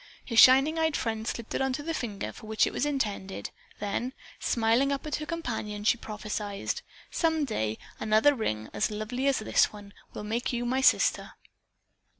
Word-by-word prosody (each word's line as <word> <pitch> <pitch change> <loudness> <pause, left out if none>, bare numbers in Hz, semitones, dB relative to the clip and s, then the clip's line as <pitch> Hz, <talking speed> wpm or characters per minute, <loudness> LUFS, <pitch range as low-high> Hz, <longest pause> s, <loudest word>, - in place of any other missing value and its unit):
Her 230 - -2
shining 270 +7 +7
eyed 320 -2 +2
friend 220 -1 -2
slipped 235 -2 -4
it - - -1
on 265 -1 +1
the 295 +4 -3
finger 215 -9 -4
for 220 - -12
which 220 0 +3
it - - -3
was 295 - 0
intended, 210 -9 -3 0.3
then, 220 +5 -2 0.3
smiling 235 +4 +2
up 275 +1 -2
at 305 - -1
her 305 - -6
companion, 220 -11 -4
she 215 - +4
prophesied, 210 -2 -4 0.3
"Some 320 -3 +1
day 110 - -2 0.2
another 220 +7 +4
ring, 110 - -2
as 215 - +1
lovely 215 +5 -2
as 275 - +3
this 215 - +3
one, 205 -1 -12 0.2
will - - -5
make 225 +3 -2
you 240 -1 -2
my 260 +2 +1
sister." - - +3
235 Hz, 175 wpm, -28 LUFS, 210-275 Hz, 0.3 s, shining